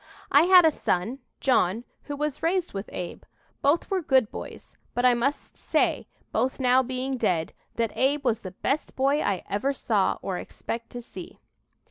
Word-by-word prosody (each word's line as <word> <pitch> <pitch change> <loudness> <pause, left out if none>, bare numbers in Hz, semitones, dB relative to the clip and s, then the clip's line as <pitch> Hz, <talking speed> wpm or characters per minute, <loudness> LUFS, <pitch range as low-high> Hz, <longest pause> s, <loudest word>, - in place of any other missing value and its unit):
"I 290 +4 +6
had 365 -1 +8
a 320 - +6
son, 225 0 -1 0.2
John, 230 -4 +2 0.2
who 290 - -4
was 300 -1 -2
raised 355 +1 0
with 195 +1 -5
Abe. 180 -1 -6 0.4
Both 290 +7 +2
were 380 -1 +1
good 260 -8 +3
boys, - - -9 0.2
but 245 - +1
I 250 - +6
must 255 +5 -2
say, - - 0 0.2
both 260 +2 0
now 255 0 +4
being 260 +1 -3
dead, 185 -11 0 0.2
that 230 -2 -1
Abe 280 +2 +1
was 230 -3 +2
the 190 - -7
best 275 +10 -2
boy 275 +3 +2
I 195 -2 -1
ever 235 +8 0
saw 215 -7 +1
or 185 -2 -2
expect 230 0 -6
to 245 - -5
see." 235 - -10
255 Hz, 175 wpm, -26 LUFS, 220-285 Hz, 0.4 s, had